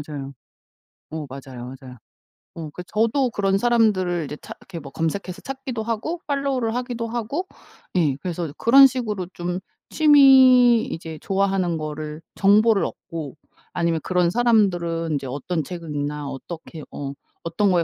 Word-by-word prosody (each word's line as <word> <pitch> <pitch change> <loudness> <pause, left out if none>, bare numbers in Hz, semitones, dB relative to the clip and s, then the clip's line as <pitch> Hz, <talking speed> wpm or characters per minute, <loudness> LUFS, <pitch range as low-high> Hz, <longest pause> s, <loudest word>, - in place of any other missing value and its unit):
맞아요. 145 -2 -7 0.8
어 155 -1 -5
맞아요 130 -2 -8
맞아요. 130 -2 -11 0.6
어 160 -2 -5
그 180 - -8
저도 230 +7 +1
그런 195 -2 +1
사람들을 195 -7 +2
이제 150 - -7
찾 - - -10
그렇게 175 -3 -9
뭐 140 -3 -10
검색해서 175 +4 -3
찾기도 265 -4 -5
하고 235 +10 -3
팔로우를 275 -5 0
하기도 245 -2 -3
하고 240 - -3 0.5
예. 155 -7 +2
그래서 170 -3 -4
그런 270 +4 +8
식으로 220 -7 -3
좀 175 +1 -3 0.3
취미 260 -5 +7
이제 160 -1 -6
좋아하는 195 -3 0
거를 155 0 -5
정보를 205 0 +4
얻고 155 -4 -7 0.4
아니면 170 -2 0
그런 180 -2 +2
사람들은 175 -8 +2
인제 140 -2 -2
어떤 150 +5 -3
책을 170 0 -8
읽나 145 0 -3
어떻게 160 +3 -8
어 140 -1 -5 0.3
어떤 190 +4 +1
거에 175 -2 +3
180 Hz, 320 characters per minute, -23 LUFS, 155-230 Hz, 0.8 s, 그런